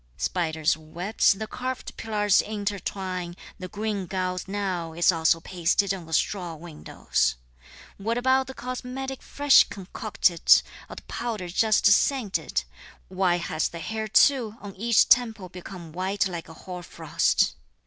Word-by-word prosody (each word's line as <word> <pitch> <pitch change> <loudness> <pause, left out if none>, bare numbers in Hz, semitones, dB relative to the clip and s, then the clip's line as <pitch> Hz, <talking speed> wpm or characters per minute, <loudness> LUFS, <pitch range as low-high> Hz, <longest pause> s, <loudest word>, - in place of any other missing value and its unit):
Spiders' 160 - 0
webs 170 +9 +1
the 210 +3 -5
carved 255 +3 -5
pillars 210 -2 +2
intertwine, 195 -4 -4 0.2
The 185 - -6
green 205 -1 -3
gauze 185 0 -3
now 190 -5 -3
is 170 +3 +4
also 165 -1 +2
pasted 180 +3 0
on 180 -4 -8
the 160 - -8
straw 175 0 0
windows! 155 - -2 0.6
What 225 +4 -2
about 260 +1 +2
the 265 - -8
cosmetic 255 +2 -5
fresh 285 -1 +5
concocted 195 -3 +2 0.3
or - - -8
the - - -10
powder 215 -7 -4
just 215 +4 +2
scented; 205 - +2 0.5
Why 185 -2 +1
has 160 -2 -1
the 170 - -8
hair 220 +6 -4
too 225 0 +4
on 200 -2 -9
each 230 +3 +3
temple 225 -6 +3
become 180 -2 -10
white 190 +4 -1
like 170 -3 -6
hoarfrost! 175 - -1
190 Hz, 135 wpm, -26 LUFS, 175-220 Hz, 0.6 s, fresh